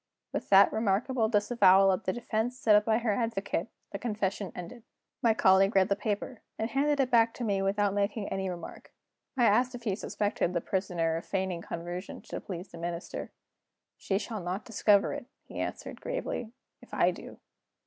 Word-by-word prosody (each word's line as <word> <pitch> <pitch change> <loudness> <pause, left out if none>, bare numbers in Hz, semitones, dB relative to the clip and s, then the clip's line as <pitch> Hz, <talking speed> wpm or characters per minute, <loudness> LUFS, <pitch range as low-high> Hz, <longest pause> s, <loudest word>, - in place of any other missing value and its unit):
With - - -4
that 195 0 +7
remarkable 220 +2 +1
disavowal 205 -3 +5
of 185 - -2
the 185 - +1
defense 240 +2 -2
set 220 -4 +4
up 210 0 +4
by 220 -1 +3
her 230 -2 0
advocate, 200 -6 -2 0.2
the 200 - -5
confession 205 -4 -2
ended. 180 +7 -8 0.4
My 225 -2 +3
colleague 195 +1 +4
read 190 -1 +4
the 200 - +3
paper, 210 +3 -3 0.2
and 220 +2 -2
handed 290 +1 +1
it 265 -1 +1
back 230 -1 +4
to 245 - -5
me 200 -3 0
without 200 +1 +1
making 205 +1 -1
any 190 -1 -2
remark. 175 -1 -8 0.5
I 245 - +3
asked 245 +4 +3
if 240 - -9
he 205 -5 0
suspected 205 -3 -1
the 170 - +1
Prisoner 170 -4 -1
of 165 - -7
feigning 190 -3 -2
conversion 175 +3 -6
to - - -6
please 180 0 -7
the 170 - -10
Minister. 170 0 -5 0.6
"She 195 - -1
shall 215 0 -4
not 180 +4 -4
discover 205 -2 +3
it," 245 - -7 0.2
he - - -9
answered, - - -5
gravely, - - -4 0.3
"if - - -10
I - - +4
do." - - -10
205 Hz, 185 wpm, -29 LUFS, 190-230 Hz, 0.6 s, that